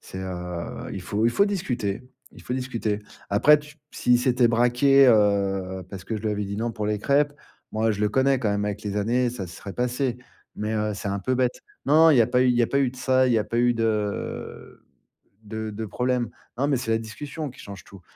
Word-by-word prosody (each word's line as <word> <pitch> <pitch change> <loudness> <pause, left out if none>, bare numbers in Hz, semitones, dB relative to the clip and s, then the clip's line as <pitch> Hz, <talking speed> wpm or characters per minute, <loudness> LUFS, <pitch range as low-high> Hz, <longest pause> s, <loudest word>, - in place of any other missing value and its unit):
c'est, 95 - -9
heu, 90 -2 -5
il - - -5
faut 105 +2 -1
il 120 - +3
faut 200 - +4
discuter 125 - -2 0.3
il - - -14
faut - - -5
discuter. 115 -5 -2 0.3
Après 145 +9 +6
tu 150 0 -14 0.2
s'il 125 0 +3
s'était 125 -1 +3
braqué, 125 +4 +4
heu, 100 -3 +2
parce 95 -1 -8
que 110 - -3
je 105 - -7
lui 110 - 0
avais 105 0 -2
dit: 100 +1 -5
«Non» 115 +2 -1
pour 105 -2 -3
les 105 -1 0
crêpes, 145 +4 +2 0.4
moi 110 +1 +1
je 105 - -5
le 105 - +2
connais 135 +4 +2
quand 115 -4 0
même 100 0 0
avec 105 0 -3
les 105 -1 -4
années, 120 +4 +1
ça 100 -6 -6
serait 95 +2 -9
passé, 125 0 -1 0.4
mais, 105 +1 -2
heu, 105 -1 -1
c'est 100 - -5
un 100 +1 -1
peu 130 +6 0
bête. 125 -1 0 0.2
Non, 145 - +3
non, - - +8
il 145 - +5
y - - +7
a - - +1
pas 125 0 +2
eu 130 - +3
il 120 -1 +3
a - - +3
pas 140 - +1
eu 130 - +2
de - - -14
ça, 130 0 +2
il 125 - +2
y 115 - +4
a 105 - +1
pas 115 +2 -2
eu 120 0 +3
de 110 -3 -3 0.6
de 110 +1 -5
de 110 +2 -5
problèmes. 125 +1 -1 0.3
Non, 140 +2 +1
mais 140 - +2
c'est 120 -2 -5
la 110 - +3
discussion 145 +6 -6
qui - - -18
change 100 -2 -10
tout. 100 -2 -15
115 Hz, 245 wpm, -25 LUFS, 105-125 Hz, 0.6 s, non